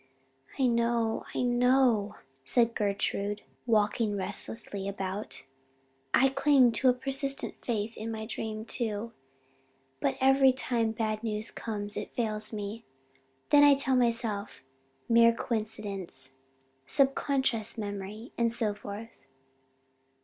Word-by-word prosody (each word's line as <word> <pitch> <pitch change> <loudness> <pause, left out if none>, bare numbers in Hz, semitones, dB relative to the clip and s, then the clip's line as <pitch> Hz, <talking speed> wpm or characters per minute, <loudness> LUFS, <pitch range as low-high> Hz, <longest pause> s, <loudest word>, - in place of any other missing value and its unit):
"I 265 - +2
know 235 -1 +1
I - - 0
know," 245 -4 +3 0.3
said 230 - +2
Gertrude, 205 0 -1 0.2
walking 210 -1 +2
restlessly 200 +1 -2
about. 195 -4 -4 0.7
"I 270 +2 +5
cling 270 -2 +4
to 255 +3 +3
a - - +5
persistent 270 +2 -2
faith 225 -1 -2
in 220 +1 -5
my 220 -1 -4
dream, 220 -1 -5
too 230 -2 -3 0.9
but 135 - 0
every 270 0 +5
time 235 -3 0
bad 215 -1 -2
news 220 -1 -2
comes 205 -2 -4
it - - -6
fails 215 -3 -1
me. 215 +1 -5 0.7
Then 290 0 +7
I 290 -1 +8
tell 270 -1 +2
myself 230 - 0 0.4
'mere 230 0 +6
coincidence' 205 - -3 0.6
'subconscious 265 - +1
memory' 205 +2 -6
and 230 -1 +3
so 225 -3 0
forth." 205 -4 -9
225 Hz, 115 wpm, -29 LUFS, 210-245 Hz, 0.9 s, I